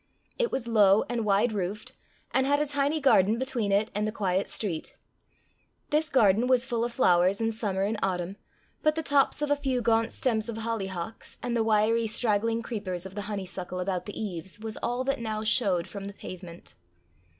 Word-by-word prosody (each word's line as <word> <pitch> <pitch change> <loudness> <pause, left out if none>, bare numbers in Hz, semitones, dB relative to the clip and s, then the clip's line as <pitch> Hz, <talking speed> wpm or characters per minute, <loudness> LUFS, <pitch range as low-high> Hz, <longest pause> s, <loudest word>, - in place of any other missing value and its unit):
It 480 -1 +1
was 250 -3 -2
low 210 -3 +5
and 235 -2 -1
wide 210 +3 +3
roofed, 200 +1 -3 0.4
and 265 0 +2
had 285 +1 +3
a 300 - +1
tiny 285 +2 0
garden 220 -6 +4
between 245 -5 -1
it 210 +3 +2
and 210 +1 0
the - - -1
quiet 195 -3 -1
street. 175 -7 -3 0.9
This 305 +1 +2
garden 225 -3 +4
was 255 -1 +4
full 235 -3 -1
of 240 - -1
flowers 185 -5 +3
in 225 0 +1
summer 200 -4 -1
and 210 +2 -1
autumn, 185 0 -2 0.4
but 305 0 +2
the 320 - -2
tops 285 0 +2
of 295 - -1
a - - +5
few 270 -3 -1
gaunt 230 -1 +2
stems 225 -3 -1
of 225 - -4
hollyhocks, 220 -3 -4
and 245 -1 -1
the 230 - +2
wiry 225 +1 +2
straggling 225 +1 +1
creepers 190 -7 -4
of 190 - -8
the 205 - -4
honeysuckle 185 -2 -4
about 180 0 -2
the 205 - -6
eaves, 190 -2 -4
was 220 0 -5
all 245 +2 -2
that 275 -1 -1
now 220 -2 -3
showed 205 -6 +1
from 200 -1 -7
the 200 - -7
pavement. 180 -3 -9
220 Hz, 195 wpm, -28 LUFS, 195-245 Hz, 0.9 s, low